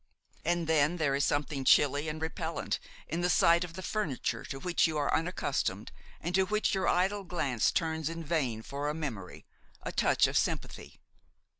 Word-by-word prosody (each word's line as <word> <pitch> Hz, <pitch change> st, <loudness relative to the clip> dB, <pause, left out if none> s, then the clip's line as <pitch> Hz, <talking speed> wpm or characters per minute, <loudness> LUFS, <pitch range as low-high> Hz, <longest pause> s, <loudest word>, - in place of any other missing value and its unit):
And 175 Hz, 0 st, 0 dB
then 160 Hz, +1 st, +2 dB
there 150 Hz, -5 st, +1 dB
is 140 Hz, +1 st, +1 dB
something 145 Hz, +2 st, 0 dB
chilly 145 Hz, +3 st, +4 dB
and 155 Hz, +1 st, -5 dB
repellent 160 Hz, 0 st, -3 dB, 0.3 s
in 170 Hz, -, -2 dB
the 180 Hz, -, +1 dB
sight 170 Hz, 0 st, +5 dB
of 175 Hz, -2 st, -7 dB
the 185 Hz, +2 st, -7 dB
furniture 140 Hz, -, -2 dB
to 135 Hz, -, -6 dB
which 175 Hz, +2 st, +2 dB
you 160 Hz, -1 st, -2 dB
are 145 Hz, -1 st, 0 dB
unaccustomed 140 Hz, -, -1 dB, 0.3 s
and 175 Hz, +3 st, -4 dB
to 190 Hz, 0 st, +3 dB
which 215 Hz, +1 st, +1 dB
your 190 Hz, -1 st, 0 dB
idle 195 Hz, +3 st, +2 dB
glance 140 Hz, -, 0 dB
turns 160 Hz, -2 st, -1 dB
in 165 Hz, 0 st, -5 dB
vain 135 Hz, -9 st, -1 dB
for 145 Hz, +4 st, -3 dB
a 150 Hz, -, -2 dB
memory, 115 Hz, -, -6 dB, 0.4 s
a -, -, -3 dB
touch -, -, +3 dB
of -, -, +2 dB
sympathy. -, -, -4 dB
160 Hz, 180 wpm, -30 LUFS, 140-175 Hz, 0.4 s, sight